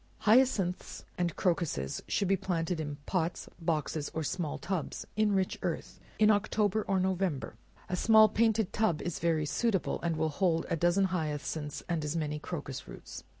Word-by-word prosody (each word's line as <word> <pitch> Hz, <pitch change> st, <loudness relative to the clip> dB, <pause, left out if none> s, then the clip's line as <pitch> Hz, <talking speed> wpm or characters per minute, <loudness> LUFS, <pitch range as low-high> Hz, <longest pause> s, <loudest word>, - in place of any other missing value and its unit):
Hyacinths 215 Hz, -6 st, +2 dB
and 175 Hz, -2 st, -1 dB
crocuses 165 Hz, -, -1 dB
should 200 Hz, -, 0 dB
be 195 Hz, -, +4 dB
planted 180 Hz, -2 st, -1 dB
in 145 Hz, -2 st, -3 dB
pots, 175 Hz, -2 st, -1 dB
boxes, 155 Hz, -2 st, -1 dB
or 160 Hz, -, -1 dB
small 155 Hz, -1 st, -2 dB
tubs, 185 Hz, -5 st, -3 dB
in 215 Hz, 0 st, +3 dB
rich 190 Hz, -2 st, 0 dB
earth, -, -, -4 dB, 0.2 s
in 215 Hz, 0 st, +6 dB
October 210 Hz, 0 st, +1 dB
or 195 Hz, -1 st, +2 dB
November; 185 Hz, -5 st, -1 dB, 0.3 s
a 180 Hz, -, -1 dB
small 220 Hz, +3 st, +7 dB
painted 220 Hz, -1 st, +1 dB
tub 215 Hz, -8 st, +1 dB
is 175 Hz, -2 st, -3 dB
very 160 Hz, -2 st, +1 dB
suitable, 205 Hz, +5 st, 0 dB
and 170 Hz, -1 st, 0 dB
will 160 Hz, 0 st, +1 dB
hold 165 Hz, +1 st, +1 dB
a -, -, +3 dB
dozen 175 Hz, +4 st, +3 dB
hyacinths, 150 Hz, -2 st, -3 dB
and 170 Hz, -3 st, -1 dB
as 150 Hz, +2 st, -2 dB
many 150 Hz, -2 st, -2 dB
crocus 145 Hz, -5 st, -6 dB
roots. -, -, -9 dB
175 Hz, 165 wpm, -31 LUFS, 160-195 Hz, 0.3 s, small